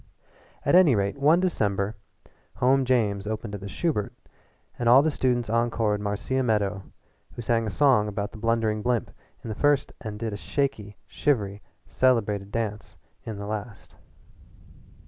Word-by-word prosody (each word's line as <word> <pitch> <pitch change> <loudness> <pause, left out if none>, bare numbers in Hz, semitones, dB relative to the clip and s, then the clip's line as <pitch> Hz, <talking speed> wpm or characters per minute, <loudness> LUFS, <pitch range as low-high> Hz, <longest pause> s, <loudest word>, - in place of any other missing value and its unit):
At - - +2
any 175 -8 +6
rate 100 +5 -1
one 155 +5 +5
December, 105 - 0 0.6
"Home 130 +1 +3
James" 105 -6 +1
opened 110 0 -4
at 100 - -6
the 100 - -6
Shubert, 145 - -1 0.7
and 120 -1 +2
all 130 +4 +7
the 160 - +1
students 125 -4 0
encored 115 -2 0
Marcia 105 +6 -1
Meadow, 105 -5 0 0.5
who - - -7
sang 115 0 +1
a - - -1
song 125 -2 +3
about 105 0 -3
the 110 - -11
Blundering 115 -1 0
Blimp 120 -1 -1 0.3
in - - -6
the - - -2
first 145 +4 +2
act - - -27
and 105 -1 -5
did 110 -1 -4
a - - -4
shaky, 110 -5 -3
shivery, 105 -8 -1 0.2
celebrated 105 -6 +1
dance 105 -6 -4 0.3
in 110 -3 -5
the 100 - -6
last. 105 +1 -6
110 Hz, 160 wpm, -26 LUFS, 105-130 Hz, 0.7 s, all